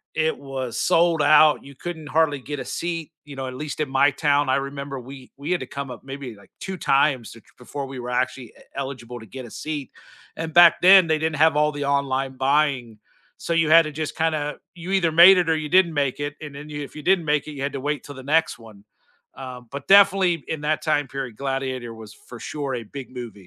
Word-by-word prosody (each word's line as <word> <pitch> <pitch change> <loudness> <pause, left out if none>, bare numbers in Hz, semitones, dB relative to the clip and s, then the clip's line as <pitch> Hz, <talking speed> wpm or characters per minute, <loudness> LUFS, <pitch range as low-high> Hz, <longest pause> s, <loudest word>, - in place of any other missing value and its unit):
it 160 0 0
was 135 -3 -5
sold 165 -2 +3
out; 150 +1 +5
you 140 0 -14
couldn't 160 +1 -7
hardly 145 -2 +1
get 145 +3 -6
a 130 - -5
seat, 165 +4 -4
you 145 -2 -10
know, 135 -1 -5
at 130 - -6
least 150 +2 -5
in 145 - -2
my 135 +2 +3
town, 145 0 +1
I 130 - +3
remember 140 0 -4
we 130 +1 -12
we 145 +5 -5
had 180 - +1
to - - -4
come 140 -2 -6
up 120 - -10
maybe 135 -4 -7
like 100 - -20
2 190 -1 -5
times 135 -6 +1
ch - - -13 0.2
before 135 +3 -6
we 135 -1 -8
were 125 0 -6
actually 125 0 -1
e - - -22 0.2
eligible 125 -3 -6
to 110 - -12
get 130 +4 -9
a 115 - -12
seat, 150 -4 -6 0.5
and 160 -1 -5
back 175 -1 +7
then 185 -1 +8
they 160 -1 +2
didn't 160 0 -1
have 155 -1 +4
all 150 0 +3
the 145 -1 -4
online 135 -1 -1
buying. 135 -5 0 0.4
So, 170 - -2
you 160 -2 +2
had 165 +1 +8
to 155 - -6
just 155 0 -5
kinda 155 -2 -1 0.2
you 175 +2 -7
either 175 -4 +2
made 180 +4 +9
it 175 -2 +1
or 160 - +3
you 155 -1 -5
didn't 175 -2 +4
make 140 -3 -1
it, 145 0 -4
and 150 -2 -8
then 145 +2 -9
you 145 -1 -6
if 140 - -11
you 150 - -7
didn't 180 0 +3
make 150 -1 0
it, 155 - -6
you 140 - -8
had 140 - -2
to 135 - -4
wait 145 +1 -2
till 145 - -10
the 130 - -10
next 160 +1 +1
one. 110 -3 -15 0.5
Um, 125 -2 -9
but 140 0 -7
definitely 195 -5 +5
in 155 - -3
that 155 +1 -1
time 150 -3 0
period, 130 -5 -6
Gladiator 135 -3 -3
was 110 -2 -12
for 120 +2 -13
sure 140 -2 -4
a 120 - -5
big 130 +4 -9
movie. 125 -3 -7
145 Hz, 245 wpm, -23 LUFS, 130-155 Hz, 0.5 s, made